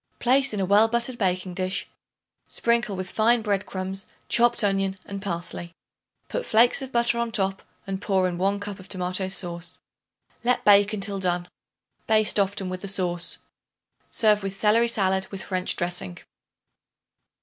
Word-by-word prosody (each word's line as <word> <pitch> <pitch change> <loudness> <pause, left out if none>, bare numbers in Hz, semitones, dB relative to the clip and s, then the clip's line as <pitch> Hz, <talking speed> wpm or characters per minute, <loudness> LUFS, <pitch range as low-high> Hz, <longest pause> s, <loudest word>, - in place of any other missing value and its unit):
Place 270 +2 +3
in 210 - -3
a 190 - +1
well 205 +4 +5
buttered 235 +2 -2
baking 185 -2 -1
dish; 185 +1 -3 0.6
sprinkle 235 -3 0
with 185 0 -5
fine 230 +1 +3
bread 205 -1 -1
crumbs, 190 0 -3 0.2
chopped 240 -1 +4
onion 195 -1 0
and 200 -1 -6
parsley. 175 -2 -4 0.5
Put - - -3
flakes 235 +4 +4
of 265 -1 -6
butter 235 -1 +2
on 235 -1 -1
top 195 -3 0 0.2
and 195 0 -4
pour 190 -3 +1
in 175 -1 -4
1 200 +2 +1
cup 205 -1 -6
of 185 - -12
tomato 185 0 -2
sauce. 175 -2 -3 0.7
Let 250 +1 +1
bake 205 0 +6
until 200 -1 -3
done. 175 -1 -1 0.6
Baste 215 -1 +4
often 195 -1 0
with 185 0 -5
the 200 - -6
sauce. 180 -3 -2 0.7
Serve 210 -2 +3
with 195 0 -4
celery 220 +4 +3
salad 190 -4 +1
with 195 -1 -6
French 185 -1 0
dressing. 175 - -3
195 Hz, 160 wpm, -25 LUFS, 185-220 Hz, 0.7 s, bake